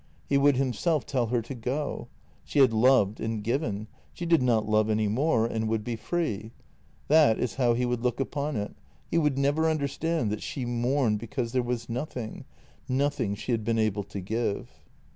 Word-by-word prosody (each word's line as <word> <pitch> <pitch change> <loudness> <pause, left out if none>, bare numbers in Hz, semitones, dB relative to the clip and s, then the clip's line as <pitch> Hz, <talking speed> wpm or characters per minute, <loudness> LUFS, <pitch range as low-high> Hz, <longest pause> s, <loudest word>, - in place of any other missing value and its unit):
He 140 - 0
would 140 0 +5
himself 135 +4 0
tell 125 -4 0
her 120 0 0
to 120 - -7
go. 130 +5 -3 0.4
She - - -5
had 130 -5 +6
loved 110 -3 +4
and 110 -1 -3
given; 110 -3 -1 0.3
she 175 - -5
did 165 -3 +4
not 115 -4 +2
love 110 0 +2
any 110 0 +2
more, 115 +1 +2
and 110 -1 -1
would 110 -1 -1
be 120 +1 -3
free. 115 - -3 0.5
That 150 -7 +5
is 125 - -1
how 120 -3 +3
he 125 +1 +1
would 120 -1 -1
look 125 0 0
upon 140 +1 -2
it; 105 -1 -3 0.4
he 165 - +3
would 150 -4 +1
never 145 +4 +2
understand 155 -3 -1
that 105 - -3
she 130 -4 -4
mourned 120 -1 +1
because 115 +1 -3
there 130 0 +2
was 120 -1 -3
nothing 120 -2 -5 0.2
— - - -31
nothing 130 -6 0
she 115 - -5
had 115 -2 0
been 115 +1 0
able 110 -2 +1
to 100 - -6
give. 110 +2 -2
120 Hz, 195 wpm, -27 LUFS, 110-140 Hz, 0.5 s, had